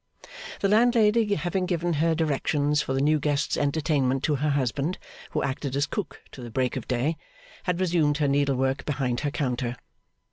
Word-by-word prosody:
The 200 - +3
landlady 220 -1 +4
having 180 +3 -1
given 175 -1 0
her 165 0 +3
directions 150 -1 +1
for 135 - -3
the 135 - +1
new 150 +2 +3
guest's 145 0 0
entertainment 140 -3 0
to 150 - +2
her 150 +3 0
husband, 140 +4 0 0.3
who - - -1
acted 135 0 -3
as 140 +1 +2
cook 190 +2 -5
to 130 - -10
the 120 - -7
Break 125 +2 -1
of - - -5
Day, 135 +6 0 0.5
had 180 -2 0
resumed 165 -5 +2
her 150 -2 +1
needlework 140 -1 +1
behind 130 -4 -1
her 145 - -1
counter. 125 -4 -2
145 Hz, 175 wpm, -26 LUFS, 135-170 Hz, 0.5 s, landlady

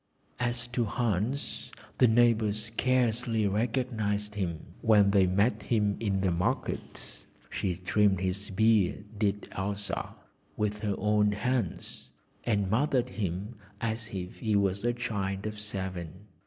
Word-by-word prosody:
As 120 0 0
to 120 -1 0
Hans, 115 +3 -1 0.3
the 125 - +7
neighbours 110 -2 +3
scarcely 115 -1 +1
recognised 105 -1 0
him 90 -6 -2 0.2
when 105 -3 +5
they 95 -2 +5
met 100 +6 +2
him 105 -3 +1
in 100 -4 0
the 95 -2 +2
markets; 85 +1 -3 0.2
she 90 -3 -1
trimmed 95 +2 +2
his 95 +2 -2
beard, 105 -1 +3
did 105 -1 0
Elsa, 100 +2 -3 0.4
with 105 0 -1
her 105 -2 -1
own 105 0 +3
hands, 115 -2 -2 0.4
and 100 -4 +1
mothered 130 +4 +2
him 100 +2 -3 0.3
as 110 0 -2
if 90 -1 -5
he 110 -2 +1
were 100 -2 +3
a 120 0 +2
child 100 -5 -2
of 105 0 -4
seven. 95 -3 -5
105 Hz, 130 wpm, -29 LUFS, 100-115 Hz, 0.4 s, the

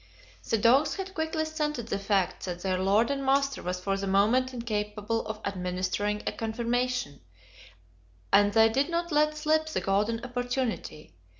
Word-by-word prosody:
The 225 - +3
dogs 245 +7 +4
had 385 -1 -6
quickly 320 -2 -1
scented 300 -7 -3
the - - -1
fact 195 -2 0
that 175 -1 -5
their 185 -1 0
lord 205 +7 +3
and 275 -1 -2
master 275 0 +1
was 180 +1 -3
for 195 +2 -1
the 195 0 -3
moment 220 +7 +3
incapable 215 -2 -2
of 215 -1 -5
administering 190 +2 -2
a - - 0
"confirmation," 235 - -2 1.1
and 205 +1 +6
they 225 +1 +6
did 270 +7 +1
not 340 0 -2
let 305 0 +2
slip 310 +1 +1
the 315 - -1
golden 210 +4 0
opportunity. 245 - -3
230 Hz, 160 wpm, -28 LUFS, 200-275 Hz, 1.1 s, and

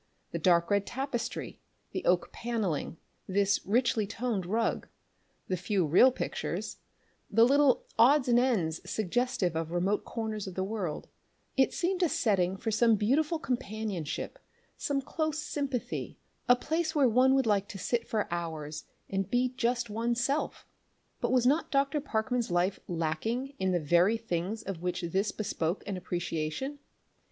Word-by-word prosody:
The - - -3
dark 170 0 +3
red 200 0 +2
tapestry, 265 -2 -4 0.3
the - - -3
oak - - +2
panelling, 210 -10 -2 0.3
this 200 +1 +2
richly 225 -1 +2
toned 220 -4 -2
rug, 225 +4 0 0.6
the 185 - 0
few 185 0 0
real 180 - +6
pictures, - - -4 0.5
the 225 +2 +5
little 280 0 +4
odds 265 +3 +6
and 240 -1 +5
ends 195 -11 +1
suggestive 215 -4 0
of 165 0 -2
remote 185 +4 +1
corners 220 -3 -4
of 185 - -7
the 190 - -1
world 195 -6 -3 0.5
it 265 -1 +4
seemed 365 +1 -1
a 350 - +3
setting 195 -7 +1
for 220 - -2
some 225 +1 +4
beautiful 285 - +1
companionship, 215 - -3 0.4
some 275 -1 -1
close 315 +2 -2
sympathy, 280 -5 -3 0.3
a 245 - +8
place 315 +5 -1
where 280 -3 +5
one 255 +3 +4
would 270 -2 +3
like 200 -2 +2
to 200 - -7
sit 235 +4 -1
for 215 -2 -1
hours 155 -3 -4 0.2
and 195 0 -2
be 250 +1 +2
just 240 -2 -1
one's 235 +2 0
self. 275 +5 -1 0.5
But - - 0
was 250 -2 +3
not 290 +6 +3
Dr. 275 +1 +1
Parkman's 240 -2 -1
life 180 +2 +1
lacking 180 - -2
in 190 0 +1
the 175 - +2
very 175 +8 +3
things 210 0 -3
of 190 -4 -5
which 180 0 -2
this 190 +5 0
bespoke 180 -4 -2
an 200 -1 -3
appreciation? 175 - -3
220 Hz, 155 wpm, -30 LUFS, 185-255 Hz, 0.6 s, a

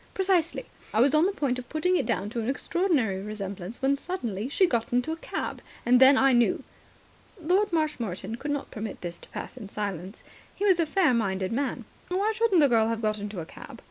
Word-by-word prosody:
"Precisely. 375 +2 +1 0.3
I - - +3
was 270 +4 +5
on 310 +4 +5
the - - 0
point 270 -9 -1
of 250 - -10
putting 360 +4 +1
it - - 0
down 200 +2 -1
to 235 - -3
an 225 - -2
extraordinary 275 - 0
resemblance, 200 +1 -6
when 275 +1 +2
suddenly 240 - -4
she 375 +6 +4
got 235 -9 -1
into 245 +6 +1
a - - -1
cab. - - -4 0.2
Then 260 +3 +7
I 270 -1 +5
knew." 240 -1 +3 0.8
Lord 365 +5 +2
Marshmoreton 230 - -2
could 290 - -5
not 290 -1 -3
permit 215 -1 -6
this 175 -1 -6
to - - -13
pass - - -7
in 210 -6 -8
silence. 195 -2 -5 0.3
He 405 - -2
was 375 -4 +4
a 330 - +2
fair 330 -4 +3
minded 190 -5 0
man. 250 -1 -2 0.2
"Why 390 +4 +1
shouldn't 445 -7 +3
the 290 - +6
girl 225 -3 +3
have 230 0 -2
got 215 0 0
into 205 -3 -5
a - - -7
cab? - - -11
250 Hz, 210 wpm, -27 LUFS, 215-325 Hz, 0.8 s, Then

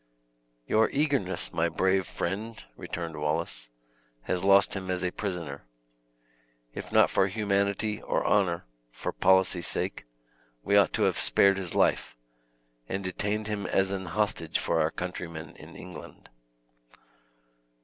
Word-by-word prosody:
"Your 110 - +3
eagerness, 100 - -1
my 85 +1 +1
brave 95 +2 +1
friend," 110 +6 -4 0.2
returned 85 -2 -5
Wallace, 75 -5 -2 0.5
"has 90 0 -1
lost 100 0 +5
him 95 -1 -5
as 90 0 -1
a 90 - 0
prisoner. 85 - -5 1.1
If - - -7
not - - +5
for 95 - +3
humanity 100 +1 0
or - - -1
honor, 90 -7 +2 0.3
for - - -4
policy's 95 -2 +3
sake, - - -3 0.6
we 100 - +2
ought 100 -4 +5
to - - +1
have - - +2
spared 100 -1 +4
his 90 -3 -3
life, - - +1 0.7
and 95 +1 -2
detained 105 +3 -2
him 105 -1 -3
as 95 0 +1
an 95 -2 -4
hostage 90 -4 0
for 80 -1 +1
our 80 - +2
countrymen 85 -3 -6
in - - -13
England." - - -11
95 Hz, 135 wpm, -28 LUFS, 85-100 Hz, 1.1 s, lost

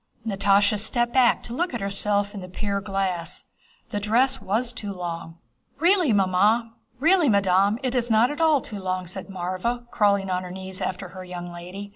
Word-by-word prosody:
Natásha 200 0 +2
stepped 240 +3 0
back 255 -2 +4
to 235 - -7
look 335 +1 -1
at - - -2
herself 200 +1 +1
in 200 - -6
the 185 - -9
pier 200 +1 -2
glass. 195 -4 -2 0.5
The 205 - -1
dress 250 +6 +2
was 230 +5 -1
too 210 -3 -5
long. 170 -3 -6 0.4
"Really, 345 -2 +3
madam, 210 - +2
it 255 -1 -1
is 245 -2 0
not 225 +3 +4
at 295 - -4
all 310 -4 +4
too 220 -8 -7
long," 185 -1 -2
said 185 +2 -8
Mávra, 195 +6 -3
crawling 200 -3 +2
on 180 0 0
her 180 - -7
knees 190 0 -7
after 185 0 -3
her 185 0 -9
young 175 -1 -7
lady. 180 +4 -8
200 Hz, 175 wpm, -24 LUFS, 185-240 Hz, 0.5 s, back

